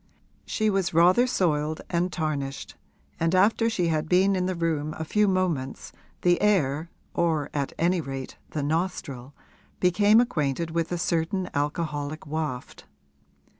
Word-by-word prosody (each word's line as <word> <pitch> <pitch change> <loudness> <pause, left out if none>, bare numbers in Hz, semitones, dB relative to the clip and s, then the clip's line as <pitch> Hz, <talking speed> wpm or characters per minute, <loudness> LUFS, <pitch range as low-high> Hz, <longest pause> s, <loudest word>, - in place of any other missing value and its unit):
She 215 -1 +1
was 190 -5 0
rather 180 +9 +5
soiled 155 -8 0
and 180 +1 0
tarnished, 145 -5 -3 0.4
and 165 +2 +1
after 220 +4 +3
she 180 -6 0
had 155 -1 -1
been 190 +2 +4
in 180 -1 0
the 185 - -1
room 155 -3 -1
a 160 - -4
few 210 +5 +2
moments 175 -9 -1 0.3
the 175 -1 +3
air, 165 -6 +2 0.2
or 160 -4 0
at 140 -2 -2
any 175 +1 +2
rate 135 -2 -6
the 150 - -3
nostril, 145 -5 -3 0.4
became 205 +4 +5
acquainted 165 - 0
with 165 0 -1
a 175 - 0
certain 170 +2 -1
alcoholic 150 0 -2
waft. 150 -4 -4
165 Hz, 140 wpm, -26 LUFS, 150-185 Hz, 0.4 s, rather